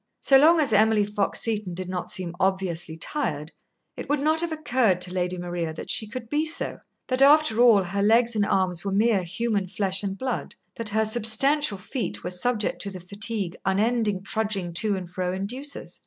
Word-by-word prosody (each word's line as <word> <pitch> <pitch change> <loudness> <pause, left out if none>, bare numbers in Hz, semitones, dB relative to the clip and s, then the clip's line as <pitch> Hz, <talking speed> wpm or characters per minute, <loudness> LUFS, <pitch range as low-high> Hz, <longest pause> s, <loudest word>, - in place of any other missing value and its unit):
So 270 - +3
long 325 +4 +5
as 290 -3 +2
Emily 215 0 +3
Fox 205 -1 -1
Seton 210 -6 -1
did 185 0 -5
not 180 -1 -4
seem 175 -2 -1
obviously 180 -4 -1
tired, 160 - -3 0.4
it - - -8
would 290 0 +1
not 310 +3 +2
have 340 -1 -3
occurred 255 - +1
to 180 0 0
Lady 180 0 -2
Maria 175 -2 -4
that - - -3
she 220 - +3
could 235 +1 -7
be 295 +5 0
so; 320 +1 0 0.3
that, 255 +1 -1
after 285 -5 +5
all, 225 -5 +6
her 195 +3 -3
legs 230 +3 +3
and 210 - +2
arms 185 -3 0
were 200 - -3
mere 210 0 +2
human 200 +2 -2
flesh 190 0 0
and 195 -1 -4
blood, 255 0 -4 0.2
that 230 -2 -4
her 220 +1 +1
substantial 235 +3 +2
feet 235 +6 -5
were 180 - -4
subject 210 +4 -1
to 200 - -1
the 190 -2 -9
fatigue 200 0 -2
unending 210 0 0
trudging 205 -5 -2
to 205 +4 +2
and 180 -2 -7
fro 180 0 -3
induces. 250 +10 -5
205 Hz, 195 wpm, -24 LUFS, 185-240 Hz, 0.4 s, all